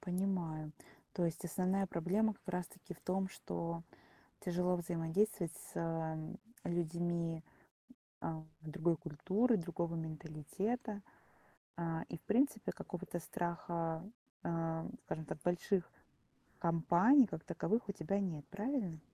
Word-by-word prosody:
понимаю. 175 Hz, -5 st, 0 dB, 0.4 s
То 175 Hz, -, +1 dB
есть 165 Hz, 0 st, -1 dB
основная 185 Hz, +3 st, +2 dB
проблема 200 Hz, +6 st, +2 dB
как 195 Hz, -, -24 dB
раз 180 Hz, -1 st, 0 dB
таки 185 Hz, 0 st, -10 dB
в -, -, -18 dB
том, 190 Hz, +1 st, +1 dB
что 170 Hz, -3 st, -3 dB, 0.6 s
тяжело 180 Hz, 0 st, +2 dB
взаимодействовать 175 Hz, +2 st, +1 dB
с, -, -, -10 dB
э, -, -, +1 dB
м, 160 Hz, -1 st, -2 dB, 0.2 s
людьми, 170 Hz, -1 st, 0 dB, 0.8 s
а, 160 Hz, -1 st, -2 dB, 0.2 s
другой 160 Hz, +2 st, +2 dB
культуры, 190 Hz, +10 st, +3 dB
другого 170 Hz, -1 st, -1 dB
менталитета. 165 Hz, -, -2 dB, 0.8 s
А, 165 Hz, -1 st, 0 dB
и, -, -, -3 dB
в -, -, -21 dB
принципе, 230 Hz, 0 st, +3 dB
какого-то 175 Hz, -1 st, -4 dB
страха, 170 Hz, -1 st, -1 dB, 0.4 s
а, 165 Hz, -1 st, 0 dB
м, -, -, -4 dB
скажем 160 Hz, -1 st, -3 dB
так, 150 Hz, -, -3 dB
больших 175 Hz, +1 st, +2 dB, 0.7 s
компаний 175 Hz, -, +7 dB
как 160 Hz, -, -5 dB
таковых 200 Hz, +6 st, +1 dB
у -, -, +4 dB
тебя 195 Hz, +2 st, 0 dB
нет, 165 Hz, -7 st, -1 dB
правильно? 200 Hz, -, -1 dB
175 Hz, 125 wpm, -38 LUFS, 165-195 Hz, 0.8 s, компаний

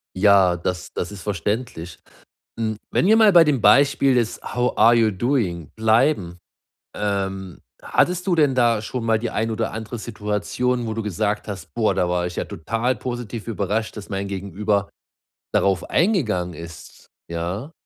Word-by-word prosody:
Ja, 95 Hz, -2 st, +4 dB
das 90 Hz, +1 st, -4 dB
das 90 Hz, -, -4 dB
ist 100 Hz, -3 st, -9 dB
verständlich. 100 Hz, -3 st, -3 dB, 0.6 s
Hm, 110 Hz, -1 st, -1 dB
wenn -, -, +2 dB
wir 220 Hz, -, +6 dB
mal 215 Hz, -2 st, +6 dB
bei 170 Hz, -2 st, +8 dB
dem 140 Hz, -7 st, +1 dB
Beispiel 140 Hz, +3 st, +5 dB
des 120 Hz, -3 st, 0 dB
„How 125 Hz, +1 st, -1 dB
are 115 Hz, +2 st, +6 dB
you 115 Hz, -2 st, +3 dB
doing“ 95 Hz, -, -1 dB
bleiben, 110 Hz, -, +2 dB, 0.6 s
ähm, 95 Hz, -3 st, -3 dB, 0.2 s
hattest 180 Hz, +1 st, +1 dB
du 185 Hz, -, +2 dB
denn 150 Hz, -5 st, +3 dB
da 120 Hz, -3 st, +3 dB
schon 115 Hz, +2 st, -5 dB
mal 115 Hz, -1 st, +2 dB
die 115 Hz, 0 st, -3 dB
ein 115 Hz, +1 st, -1 dB
oder 110 Hz, 0 st, -2 dB
andere 110 Hz, +2 st, -6 dB
Situation, 115 Hz, +3 st, -2 dB
wo 110 Hz, -, -3 dB
du 115 Hz, -, -3 dB
gesagt 105 Hz, +1 st, -2 dB
hast: 95 Hz, -5 st, -8 dB
„Boah, 115 Hz, -2 st, +1 dB
da 90 Hz, -, +1 dB
war 90 Hz, 0 st, 0 dB
ich 90 Hz, -, -6 dB
ja -, -, -1 dB
total 115 Hz, +9 st, -2 dB
positiv 120 Hz, -3 st, -6 dB
überrascht, 110 Hz, +1 st, -2 dB
dass 100 Hz, -, -9 dB
mein 100 Hz, -1 st, -3 dB
Gegenüber 100 Hz, +1 st, -1 dB, 0.6 s
darauf 95 Hz, -3 st, +2 dB
eingegangen 110 Hz, -, +1 dB
ist,“ 80 Hz, 0 st, -11 dB, 0.2 s
ja? 90 Hz, -, -4 dB
110 Hz, 165 wpm, -22 LUFS, 95-120 Hz, 0.6 s, bei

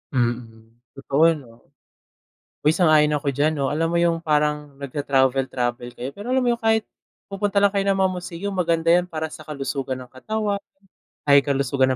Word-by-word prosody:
Mm. 120 Hz, -3 st, -2 dB, 0.2 s
Totoo 140 Hz, +2 st, 0 dB
'no. 125 Hz, -7 st, -10 dB, 0.9 s
Uy, 150 Hz, -, +5 dB
sang-ayon 155 Hz, -4 st, +4 dB
ako 140 Hz, -, -1 dB
diyan 145 Hz, +3 st, +1 dB
'no, 140 Hz, -3 st, -1 dB
alam 155 Hz, +3 st, 0 dB
mo 170 Hz, -, +2 dB
yung 170 Hz, -1 st, +2 dB
parang 150 Hz, -2 st, 0 dB
nagta-travel-travel 130 Hz, -3 st, 0 dB
kayo, 125 Hz, +2 st, -5 dB
pero 205 Hz, -, -5 dB
alam 260 Hz, -, +3 dB
mo 245 Hz, -, +1 dB
yung 235 Hz, -, +1 dB
kahit 220 Hz, 0 st, +4 dB, 0.5 s
pupunta 200 Hz, 0 st, 0 dB
lang 200 Hz, -, +5 dB
kayo 200 Hz, 0 st, -1 dB
ng 200 Hz, -, +3 dB
mga 190 Hz, -1 st, +2 dB
museum 180 Hz, +2 st, -5 dB
maganda 170 Hz, -3 st, +1 dB
yan 175 Hz, +1 st, +5 dB
para 160 Hz, -3 st, -4 dB
sa 155 Hz, 0 st, -11 dB
kalusugan 135 Hz, -3 st, -4 dB
ng 125 Hz, -, -12 dB
katawan, 205 Hz, +10 st, -2 dB, 0.7 s
ay 140 Hz, -1 st, +6 dB
kalusugan 135 Hz, -1 st, +1 dB
150 Hz, 170 wpm, -23 LUFS, 135-180 Hz, 0.9 s, ay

